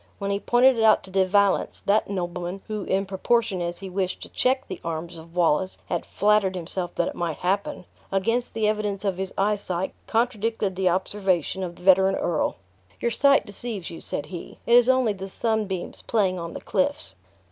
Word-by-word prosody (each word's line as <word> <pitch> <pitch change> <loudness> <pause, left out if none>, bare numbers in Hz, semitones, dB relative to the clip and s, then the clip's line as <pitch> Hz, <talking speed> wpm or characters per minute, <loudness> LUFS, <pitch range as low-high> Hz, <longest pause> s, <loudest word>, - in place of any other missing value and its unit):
When 200 -1 -2
he 200 - 0
pointed 245 +2 +4
it - - +2
out 220 -1 +5
to 190 - -10
De 190 0 +3
Valence, 200 0 +2
that 205 +1 +2
nobleman 180 0 -4
(who, 215 -2 -4
in 195 +1 0
proportion 195 0 0
as 175 +1 -4
he 195 - -6
wished 185 0 -2
to - - -10
check 260 +1 +1
the 185 - -7
arms 165 +1 -4
of 165 +1 -12
Wallace, 175 +1 +2
had 175 - -2
flattered 205 -2 +2
himself 175 +1 -4
that 170 - +1
it - - -3
might 170 -3 -3
happen), 190 0 -1 0.3
against 230 +6 0
the 220 -1 +1
evidence 210 -2 -1
of 190 -2 0
his 190 0 -3
eyesight, 195 -2 -1
contradicted 225 -3 0
the 185 -1 +2
observation 190 -1 0
of 175 -2 -4
the - - -16
veteran 190 +1 +5
earl. 170 -4 0 0.4
"Your 235 - 0
sight 275 +4 +4
deceives 205 -2 -5
you," 165 - -8
said 145 - -3
he, 170 +2 -8
"it 235 - +5
is 245 +1 +6
only 255 -4 +3
the 195 0 -7
sunbeams 210 -4 -2
playing 190 -5 +1
on 170 0 -6
the - - -6
cliffs." 285 +1 -1
195 Hz, 195 wpm, -25 LUFS, 180-215 Hz, 0.4 s, is